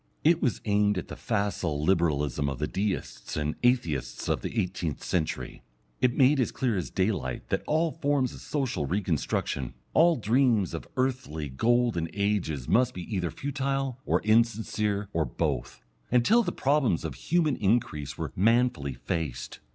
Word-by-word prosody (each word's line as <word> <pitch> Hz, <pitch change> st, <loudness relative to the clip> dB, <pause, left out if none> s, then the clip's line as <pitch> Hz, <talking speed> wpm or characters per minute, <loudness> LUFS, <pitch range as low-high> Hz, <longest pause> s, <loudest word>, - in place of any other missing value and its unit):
It 165 Hz, +2 st, +4 dB
was 125 Hz, -8 st, 0 dB
aimed 105 Hz, -1 st, +2 dB
at -, -, -4 dB
the -, -, -6 dB
facile 100 Hz, -9 st, -1 dB
Liberalism 75 Hz, -5 st, +1 dB
of 70 Hz, -, -4 dB
the 75 Hz, -, -1 dB
Deists 100 Hz, +4 st, -3 dB
and 75 Hz, 0 st, -1 dB
Atheists 85 Hz, -, 0 dB
of -, -, +1 dB
the 115 Hz, -, -2 dB
eighteenth 90 Hz, -6 st, -2 dB
century; 80 Hz, -4 st, -2 dB, 0.4 s
it 125 Hz, -1 st, +2 dB
made 135 Hz, +1 st, +5 dB
as 125 Hz, -, +1 dB
clear 125 Hz, -5 st, 0 dB
as 90 Hz, -, -2 dB
daylight 95 Hz, -, -1 dB
that -, -, 0 dB
all 160 Hz, +2 st, +2 dB
forms 145 Hz, -5 st, 0 dB
of -, -, -11 dB
social 130 Hz, -, -2 dB
reconstruction, 80 Hz, -7 st, -1 dB, 0.2 s
all 170 Hz, +1 st, +5 dB
dreams 115 Hz, -, +2 dB
of 80 Hz, -, -5 dB
earthly 125 Hz, -, -1 dB
golden 115 Hz, -, +1 dB
ages 100 Hz, -10 st, -1 dB
must 125 Hz, +1 st, +3 dB
be 90 Hz, -, -5 dB
either 90 Hz, -3 st, 0 dB
futile 135 Hz, -, -2 dB
or -, -, +1 dB
insincere 110 Hz, -2 st, +1 dB
or 80 Hz, -, +2 dB
both, 65 Hz, -, -3 dB, 0.3 s
until 125 Hz, -, +4 dB
the 180 Hz, -6 st, -1 dB
problems 135 Hz, -, +1 dB
of 80 Hz, -, -3 dB
human 155 Hz, -, +1 dB
increase 95 Hz, -, 0 dB
were 80 Hz, -4 st, -4 dB
manfully 110 Hz, -, +2 dB
faced. 65 Hz, -1 st, -4 dB
105 Hz, 155 wpm, -28 LUFS, 80-125 Hz, 0.4 s, made